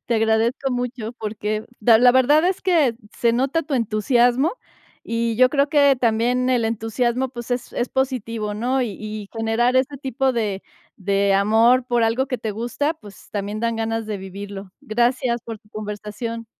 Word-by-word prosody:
te 235 - 0
agradezco 225 +5 +1
mucho 245 -2 -3
porque 215 -1 -4 0.2
da 220 +1 +6
la 245 0 +6
verdad 285 +5 +4
es 380 - -2
que 315 -11 +2 0.2
se 235 -1 +2
nota 270 +7 0
tu 290 -2 -3
entusiasmo, 245 - +2 0.5
y 230 -1 -1
yo 255 0 +5
creo 280 0 +2
que 285 -3 +4
también 245 +2 +1
el 245 -3 +2
entusiasmo, 235 +3 -1
pues, 240 -1 -9
es 245 0 -3
es 240 - -2
positivo, 230 -5 -2
¿no? 250 +4 0
Y 235 - -2
y 215 -1 -6
generar 230 +3 +1
este 270 +2 +1
tipo 265 -1 0
de 210 -5 -2 0.3
de 195 0 +1
amor 225 +5 +4
por 240 -2 +1
algo 240 +4 +1
que 255 -2 -3
te 215 -2 -4
gusta, 240 +8 -2
pues, 205 - -15
también 205 +1 -4
dan 230 -1 -1
ganas 225 0 -2
de 215 - -3
vivirlo. 195 0 -8
Gracias 240 +1 0
por 225 -2 -7
tu 210 - -28
conversación. 215 +2 -6
235 Hz, 175 wpm, -22 LUFS, 215-255 Hz, 0.5 s, da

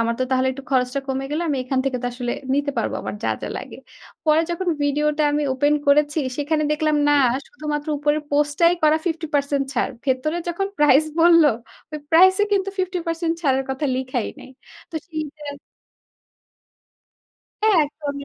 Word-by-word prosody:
আমার 230 0 +1
তো - - +3
তাহলে 260 0 +2
একটু 275 +1 -9
খরচটা 255 +1 +1
কমে 265 0 -2
গেল 305 +3 -1
আমি 285 - 0
এখান 260 0 -1
থেকে 265 -2 -1
তো 245 - -1
আসলে 245 -1 -3 0.2
নিতে 285 0 0
পারব - - -1
আমার - - -5
যা, - - 0
যা - - -3
লাগে। - - -8 0.5
পরে 310 0 +4
যখন 355 +2 -2
ভিডিওটা 300 +1 +1
আমি 295 +1 0
ওপেন 290 +3 +2
করেছি 295 +2 +3 0.2
সেখানে 305 +1 0
দেখলাম 305 0 +1
না 290 - +4 0.3
শুধুমাত্র 295 +1 -5
উপরের 295 +1 +1
পোস্টটাই 295 +4 +3
করা 310 0 +5
50% 290 -4 -1
ছাড়। 250 - 0
ভেতরে 275 +5 0
যখন 370 +3 -1
প্রাইস 295 0 +5 0.2
বলল, 335 0 +7 0.5
ওই 305 - -4
প্রাইস 370 +3 +7
এ - - +5
কিন্তু 395 -1 +1
50% 340 -3 -1
ছাড়ের 270 -3 +1
কথা 265 +3 -3
লিখাই 255 -3 -2
নাই। - - -12 0.4
তো - - -15
সেই 315 -2 -4
যে 300 - -14 2.2
হ্যাঁ, 430 -4 +4
একদমই। 285 -1 -6
295 Hz, 170 wpm, -22 LUFS, 275-320 Hz, 2.2 s, বলল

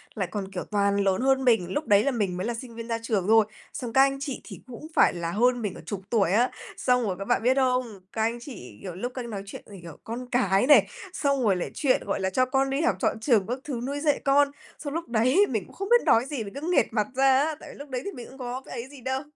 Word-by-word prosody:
lại 190 -4 -2
còn, 195 -2 -4
kiểu, 180 - -4
toàn 200 -1 +2
lớn 195 +1 +1
hơn 265 0 +2
mình, 225 -8 +2
lúc 300 -3 -2
đấy 205 -1 +5
là 280 - +1
mình 200 -7 -1
mới 190 +5 -2
là 240 - -1
sinh 230 0 -8
viên 230 0 -7
ra 230 -1 -1
trường 210 -5 -1
thôi, 220 -1 +6 0.3
xong 240 -3 -5
các 265 - +6
anh 275 0 +3
chị 275 -2 -5
thì - - -10
cũng 255 +5 -9
phải - - +5
là 170 -1 -3
hơn 245 +4 +2
mình 200 -3 -2
cả - - -10
chục 200 -3 -5
tuổi 200 -7 +2
á, 240 +5 +3 0.3
xong 250 -1 +2
rồi 190 -4 -1
các 195 - -4
bạn - - +1
biết 255 +2 +4
không? 250 -6 0
Các 220 - -2
anh 230 +2 0
chị, 125 - -10
kiểu, 180 -3 -7
lúc 245 +6 -4
các 255 - -4
anh 235 - -8
nói 200 -2 -5
chuyện - - -9
về, 200 -3 -12
kiểu, 165 -2 -10
con 245 +2 -6
cái 220 -2 +2
này, 220 -10 +7 0.3
xong 280 -6 0
rồi 200 -4 +3
lại 180 - -4
chuyện, 275 -4 +2
gọi 200 - -1
là, 190 0 0
cho 255 +7 +2
con 270 +1 +1
đi 275 +3 0
học 220 - +2
chọn 220 - 0
trường 220 -5 +2
các 250 +2 -3
thứ 250 -5 -4
nuôi 285 +1 -3
dạy 295 -1 +1
con, 280 +1 +4 0.3
xong 285 -1 -5
lúc 330 -3 -3
đấy 255 - +4
mình 215 -7 -2
cũng - - -17
không 395 +2 -5
biết 480 0 +6
nói 230 +3 +4
gì, 275 -6 -4
mình 200 - -9
cứ 280 - -7
nghệt - - +4
mặt 210 -2 0
ra 265 0 +5
á, 310 +1 0
tại - - -11
vì - - -13
lúc 285 0 -10
đấy 250 -1 -3
thì 400 - -3
mình 245 -7 -9
cũng 265 - -14
có 250 0 -5
cái 235 - -6
ấy 255 - -10
gì 280 -3 -13
đâu. 265 +2 -2
240 Hz, 300 wpm, -26 LUFS, 205-270 Hz, 0.3 s, này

